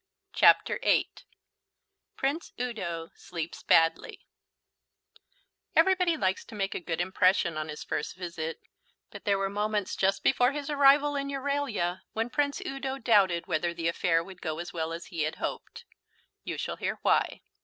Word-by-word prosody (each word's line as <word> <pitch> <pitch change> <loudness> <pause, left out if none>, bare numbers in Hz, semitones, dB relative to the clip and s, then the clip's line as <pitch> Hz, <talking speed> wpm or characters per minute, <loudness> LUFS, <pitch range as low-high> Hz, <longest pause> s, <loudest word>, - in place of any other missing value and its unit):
CHAPTER - - +5
VIII - - +3 1.1
PRINCE 285 +5 -2
UDO 170 -10 -4
SLEEPS 165 -1 -6
BADLY 165 0 +2 1.5
Everybody 365 -3 +4
likes 190 -7 0
to - - -12
make 195 -1 -2
a - - -3
good 170 -2 -4
impression 185 -2 +2
on 155 0 -4
his 150 - -6
first 150 - -3
visit, 170 -3 -5 0.5
but - - -11
there 200 -2 +3
were 195 0 0
moments 210 0 -1
just 195 0 +1
before 250 0 +3
his 295 0 -4
arrival 285 0 +5
in 280 0 -2
Euralia 275 -10 -1
when 225 +2 -2
Prince 285 +2 0
Udo 270 0 -3
doubted 195 -9 +3
whether 170 +2 -1
the 165 -1 -2
affair 165 0 +1
would 185 +1 -12
go 155 -2 -3
as 175 +3 -6
well 165 -1 -2
as 165 +1 -6
he 165 - -2
had 155 +1 -1
hoped. - - -6 0.6
You - - -4
shall - - -4
hear - - -2
why. - - +2
195 Hz, 155 wpm, -28 LUFS, 170-270 Hz, 1.5 s, CHAPTER